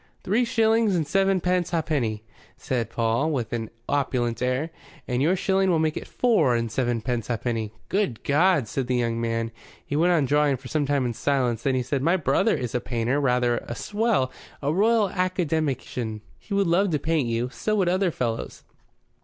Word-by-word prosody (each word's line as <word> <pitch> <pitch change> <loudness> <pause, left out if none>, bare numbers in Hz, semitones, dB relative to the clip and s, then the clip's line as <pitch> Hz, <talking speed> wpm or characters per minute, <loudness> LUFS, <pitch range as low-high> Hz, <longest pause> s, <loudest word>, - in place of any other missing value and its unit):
"Three 225 +6 +2
shillings 225 -3 +2
and 165 -3 +1
sevenpence 185 +1 +1
ha'penny," 140 -10 -1 0.3
said 120 -3 -2
Paul, 115 +7 0
with 125 -8 -2
an 115 -2 -3 0.2
opulent 125 -5 0
air. 130 +6 0 0.4
"And 125 0 0
yo'r 165 +6 +3
shilling 190 0 +1
will 170 - +3
make 155 -1 +1
it - - -6
four 200 - +2
and 115 -1 -1
sevenpence 120 -2 -1
ha'penny." 115 -2 -2 0.2
"Good 190 - -1
God!" 150 -3 +3
said 130 +3 -3
the 125 - 0
young 115 -1 0
man. 115 0 -1 0.3
He 145 - -3
went 170 +4 +3
on 160 -5 +3
drawing 145 0 +2
for 130 0 -11
some 150 -3 0
time 140 -2 +1
in 120 - -1
silence. 125 -3 0
Then 135 0 +1
he 130 - 0
said: 135 +2 -2
"My 170 +6 +3
brother 140 -5 +2
is 125 -3 -4
a 125 - 0
painter 120 +3 -1
rather 125 -3 +2
a 120 - -7
swell 210 - 0 0.3
a 145 +1 -1
Royal 215 +3 +3
Academician. 155 - -1 0.2
He 200 - -5
would 200 0 +3
love 185 +4 +2
to 155 - +1
paint 155 -2 0
you. 115 +2 -1
So 215 - -1
would 190 -4 +2
other 185 +1 +2
fellows. 115 -7 -4
140 Hz, 185 wpm, -25 LUFS, 120-180 Hz, 0.4 s, yo'r